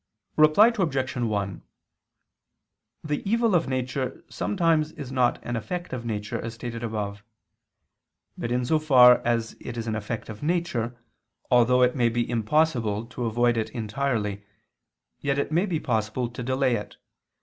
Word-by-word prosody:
Reply 155 +10 +6
Obj. 140 - -1
1: 105 -6 -2 1.4
The 150 -1 -2
evil 230 -2 +2
of 170 -4 +2
nature 130 0 -3
sometimes 165 -5 +1
is 145 -5 -8
not 125 -2 +2
an 120 - -3
effect 175 +9 -4
of 120 -2 -4
nature, 105 -2 -3
as 115 0 -6
stated 115 0 -6
above. 105 -2 -4 1.1
But 120 - -4
in 125 0 0
so 155 +5 +2
far 125 -5 +7
as 115 -1 -1
it 120 - -7
is 115 - -3
an 110 - -2
effect 110 +1 -4
of 105 -2 -9
nature, 145 -8 -1 0.5
although 125 +1 +5
it 125 +2 +3
may 120 -3 +3
be 120 +1 -1
impossible 115 -3 +1
to 120 - -4
avoid 120 +1 +2
it 110 0 -1
entirely, 110 -3 -2 0.8
yet 140 -1 -1
it 140 - -1
may 175 +6 +2
be 165 -5 -1
possible 115 -1 -1
to 120 - -8
delay 130 0 +1
it. 105 0 -9
125 Hz, 155 wpm, -26 LUFS, 115-145 Hz, 1.4 s, far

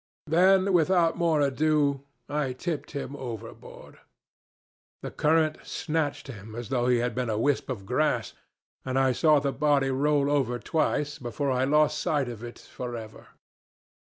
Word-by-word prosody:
Then 185 +4 +4
without 170 0 +3
more 165 -3 +2
ado 145 0 +1 0.3
I 145 -2 -1
tipped 150 +4 -4
him 140 -1 -5
overboard. 120 -6 -9 1.0
The - - -5
current 155 0 +2
snatched 150 -3 -2
him 110 -4 -10
as 120 -1 -6
though 125 -2 0
he 125 -1 +4
had 120 0 -1
been 125 0 -2
a 110 - -1
wisp 140 +5 0
of 105 -7 -5
grass, 125 -4 0 0.5
and 130 0 -2
I 135 -1 +3
saw 155 +4 +4
the 140 -1 -2
body 140 -2 +2
roll 140 +1 +2
over 130 -4 +1
twice 150 +1 -1
before 135 +2 -2
I 130 0 +1
lost 150 +2 +3
sight 140 -5 0
of 120 -1 -8
it 120 0 -8
for 125 -1 -7
ever. 110 -2 -10
140 Hz, 155 wpm, -27 LUFS, 125-150 Hz, 1.0 s, Then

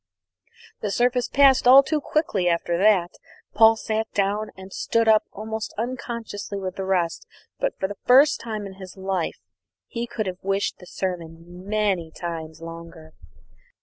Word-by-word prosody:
The 210 - -2
service 245 +3 +1
passed 270 -2 +5
all 270 +2 +9
too 300 +2 -1
quickly 215 - 0
after 170 0 0
that. 185 -2 +3 0.4
Paul 225 +1 +6
sat 220 0 -3
down 205 +2 0
and 190 0 -11
stood 230 0 0
up 220 -1 +5
almost 220 +1 -5
unconsciously 230 -4 -5
with 190 -1 -4
the 190 - -4
rest; 180 -3 -1 0.3
but - - -1
for 190 - -1
the 200 0 -9
first 270 +4 +6
time 215 -3 -5
in 195 0 -10
his 185 +1 -10
life 190 -3 -2 0.5
he 235 0 -4
could 220 -2 -3
have 185 -1 -5
wished 195 +1 -1
the 180 - -13
sermon 175 0 -6
many 200 -6 0
times 160 -1 -6
longer. 165 -1 -10
200 Hz, 155 wpm, -24 LUFS, 180-225 Hz, 0.5 s, all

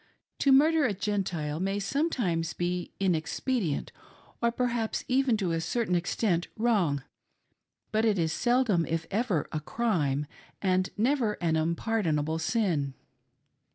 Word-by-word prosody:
To 275 - +4
murder 305 +4 +5
a 210 -5 0
Gentile 180 -7 -2
may 195 +2 -1
sometimes 200 - 0
be 175 0 -2
inexpedient, 180 - -1 0.5
or 235 0 +3
perhaps 235 -2 -1
even 255 -3 +2
to 190 -5 -1
a 165 0 0
certain 220 +3 -1
extent 175 0 0
wrong, 195 - +1 0.9
but 220 +1 +1
it 215 -3 +3
is 160 -2 +1
seldom, 240 -8 +2
if 165 0 -2
ever, 205 - 0
a 155 - -2
df'ime, 150 - 0 0.3
and 185 -1 +1
never 235 -1 +2
an 170 -5 0
unpardonable 160 -2 0
sin. 160 - 0
195 Hz, 125 wpm, -28 LUFS, 165-235 Hz, 0.9 s, murder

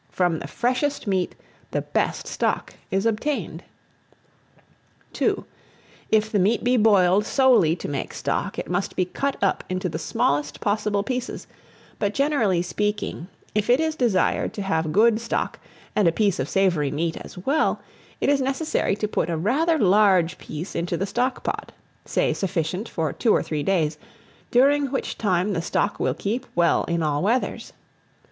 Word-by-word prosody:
From 175 -3 0
the - - -6
freshest 255 +4 -1
meat 190 -3 0 0.3
the - - -2
best - - -1
stock - - -1 0.2
is 195 +2 0
obtained. 230 +6 -1 1.6
II. - - +2 0.7
IF 220 0 +2
THE 205 - +2
MEAT 210 +5 +2
BE 250 +1 +3
BOILED 205 -4 +4
solely 225 - +4
to - - -6
make 140 -2 -3
stock, - - -2
it - - -4
must 180 +2 -2
be 185 - +1
cut 275 +10 -2
up 195 - +1
into 185 0 -1
the 160 -1 -4
smallest 145 -1 0
possible 205 -1 0
pieces; 255 +1 -4 0.5
but, 205 -1 -1
generally 235 - +2
speaking, 205 -1 -2 0.3
if 210 +1 0
it 250 +3 +5
is 320 0 +1
desired 230 -10 +1
to 205 - -3
have 160 -4 0
good 220 +4 +4
stock 230 - -2 0.4
and 205 -4 +4
a - - +5
piece 200 0 +1
of - - -2
savoury 175 -7 +2
meat 160 +3 -2
as - - -10
well, 275 - +1 0.4
it - - 0
is 280 -1 +3
necessary 270 -4 0
to 210 +1 -2
put 175 - -1
a 165 - -1
rather 295 - +2
large 190 - +4
piece 155 +5 -7
into 170 0 -2
the 195 - -1
stock 245 +6 -1
pot, - - -3 0.3
say - - +1
sufficient 180 +3 -2
for 160 -3 -2
two 230 - +1
or - - +1
three 155 -2 -3
days, 155 -3 0 0.5
during 280 +3 +4
which 270 - -3
time 190 -1 +1
the 165 - -1
stock 205 +4 -1
will - - 0
keep 235 +6 -3
well 170 -1 +3
in 170 -1 -1
all 150 -1 0
weathers. 235 +6 -1
200 Hz, 165 wpm, -24 LUFS, 175-240 Hz, 1.6 s, it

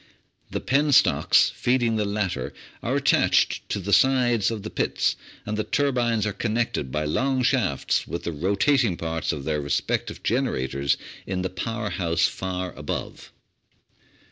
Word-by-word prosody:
The - - -3
penstocks 140 +1 +4
feeding 120 -2 +1
the 105 -1 0
latter 100 -3 -2 0.3
are - - -1
attached - - +2
to - - -1
the 100 +1 -2
sides 125 -5 +4
of 110 -3 -4
the 110 - -6
pits, - - 0 0.3
and 105 - -2
the 110 - -1
turbines 120 -6 +1
are 105 - -1
connected 110 - -1
by 75 +2 -1
long 130 - 0
shafts 120 - +1
with 85 - -5
the - - -2
rotat 100 - +2
ing 95 -7 0
parts 80 0 -2
of 70 - -5
their 75 0 -1
respective 70 -1 -2
generators 70 - 0 0.3
in 95 -1 -2
the 95 - -2
power 110 +3 -3
house 85 -3 +1
far 90 -1 -4
above. - - -6
105 Hz, 150 wpm, -24 LUFS, 85-120 Hz, 0.3 s, penstocks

